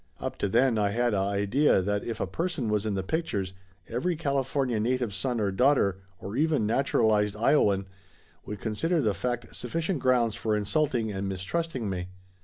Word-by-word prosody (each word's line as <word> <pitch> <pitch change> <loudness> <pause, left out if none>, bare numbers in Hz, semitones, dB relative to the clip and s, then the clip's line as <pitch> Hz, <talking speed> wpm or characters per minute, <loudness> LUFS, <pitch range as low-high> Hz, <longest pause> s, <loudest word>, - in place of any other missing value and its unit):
Up 130 -1 -4
to 100 - 0
then 120 +1 +3
I 100 -1 +2
had 120 +2 +1
a - - +1
idea 100 +8 +2
that 100 +2 -1
if 115 - -4
a - - 0
person 165 -9 -2
was 105 0 0
in 105 - -1
the 95 - -1
pictures 100 - -2 0.3
every 130 +10 -1
California 135 -5 0
native 120 -1 0
son 115 +5 -1
or 100 -2 +1
daughter, 100 -4 +3 0.2
or 100 +3 -6
even 150 -6 +2
naturalized 110 -3 +2
lowaian, 105 -4 +3 0.6
would 105 0 -6
consider 160 - 0
the 110 -8 +2
fact 120 +5 -3
sufficient 165 +6 -2
grounds 125 -4 +2
for 110 0 -1
insulting 115 +1 0
and 95 0 -3
mistrusting 115 - -3
me. 90 -2 -3
115 Hz, 175 wpm, -28 LUFS, 100-135 Hz, 0.6 s, then